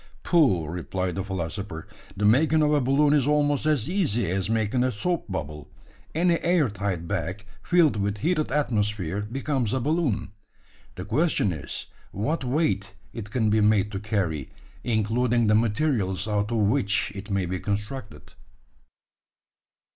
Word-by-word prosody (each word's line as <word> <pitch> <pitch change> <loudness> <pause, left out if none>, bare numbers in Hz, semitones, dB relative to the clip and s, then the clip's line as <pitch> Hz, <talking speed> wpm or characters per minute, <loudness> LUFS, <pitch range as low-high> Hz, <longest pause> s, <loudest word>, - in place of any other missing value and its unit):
"Pooh!" 130 - +3
replied 90 +3 -3
the 95 - -3
philosopher, 95 -2 -5 0.3
"the 105 - 0
making 155 +8 +4
of 150 0 +3
a 145 - +3
balloon 140 +3 +3
is 145 -3 +3
almost 145 0 +2
as 145 -6 +2
easy 120 - 0
as 95 +2 -1
making 115 +2 +1
a 130 - +1
soap 160 - -2
bubble. 75 -5 -5 0.5
Any 170 +1 +3
air 170 - +2
tight 95 -4 -3
bag, 95 +2 -3 0.2
filled 170 -9 +3
with 100 +1 -1
heated 155 - 0
atmosphere, 105 - 0
becomes 130 +1 -2
a 130 - +1
balloon. 140 - 0 0.6
The 90 - -6
question 115 - +1
is, 75 -3 -6 0.3
what 125 - -2
weight 125 -8 0 0.2
it 110 -3 -7
can 110 -2 +1
be 110 0 +3
made 105 -1 +3
to 95 - -3
carry 95 - -2 0.3
including 120 +1 +1
the 105 - +3
materials 105 -4 +1
out 105 0 0
of 115 - 0
which 105 -1 +1
it 100 0 -8
may 100 -2 0
be 90 +1 -3
constructed." 105 - -5
110 Hz, 150 wpm, -25 LUFS, 100-140 Hz, 0.6 s, making